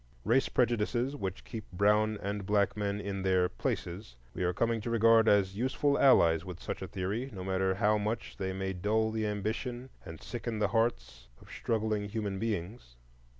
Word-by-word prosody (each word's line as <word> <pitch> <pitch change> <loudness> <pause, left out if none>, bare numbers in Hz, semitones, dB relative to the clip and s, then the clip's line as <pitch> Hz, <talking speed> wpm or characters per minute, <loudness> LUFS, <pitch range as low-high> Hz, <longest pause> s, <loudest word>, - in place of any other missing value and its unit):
Race 135 - +3
prejudices, 120 +2 +1
which 95 -9 -5
keep 110 -2 -8
brown 105 +3 +2
and 100 +1 -3
black 100 +1 +1
men 100 -1 -2
in 100 -1 -4
their 95 -1 +3
"places," - - -4 0.2
we - - -5
are 90 - +2
coming 115 +4 0
to 115 - -4
regard 115 0 +5
as 100 -2 +3
useful 130 +5 +1
allies 85 - +5
with 90 -2 -8
such - - -5
a - - -4
theory, 105 +8 -3
no 95 -4 -7
matter 95 0 0
how 105 +1 +2
much 110 +2 -3
they 95 0 -2
may 95 0 -3
dull 110 +4 0
the 110 -1 -1
ambition 115 +5 -3
and 80 -2 -9
sicken 120 -2 -5
the 105 -1 +1
hearts 65 - -1
of - - -16
struggling 110 -2 -1
human 100 -3 -3
beings. 105 - -4
105 Hz, 180 wpm, -31 LUFS, 95-115 Hz, 0.2 s, regard